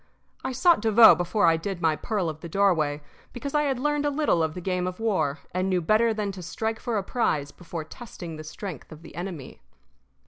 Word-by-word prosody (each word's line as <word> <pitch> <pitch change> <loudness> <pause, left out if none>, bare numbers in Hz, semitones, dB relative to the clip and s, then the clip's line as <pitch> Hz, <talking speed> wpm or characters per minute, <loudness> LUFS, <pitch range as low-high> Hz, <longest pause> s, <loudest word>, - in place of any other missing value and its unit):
I - - -2
sought 340 - +4
Devoe 220 0 +8
before 185 +4 +1
I 165 -1 +4
did 185 +2 -4
my 160 -2 +2
pearl 205 0 -2
of 155 -1 -5
the 170 - -8
doorway, 160 -6 +1 0.3
because 275 +3 -5
I 295 - +3
had 270 -3 0
learned 295 +2 0
a 290 - +2
little 285 - +1
of 160 -1 -1
the - - -4
game 180 0 -1
of 185 +2 -5
war, 185 -10 0
and 185 +1 0
knew 185 -1 +2
better 215 +7 +3
than 210 -2 -2
to 190 -1 -9
strike 220 +6 -3
for 235 -3 -2
a 200 - -1
prize 155 - -1
before 170 -2 -7
testing 170 -2 -9
the 155 - -8
strength 170 +3 -8
of 155 +1 -12
the - - -12
enemy. 170 -4 -7
185 Hz, 220 wpm, -26 LUFS, 165-225 Hz, 0.3 s, Devoe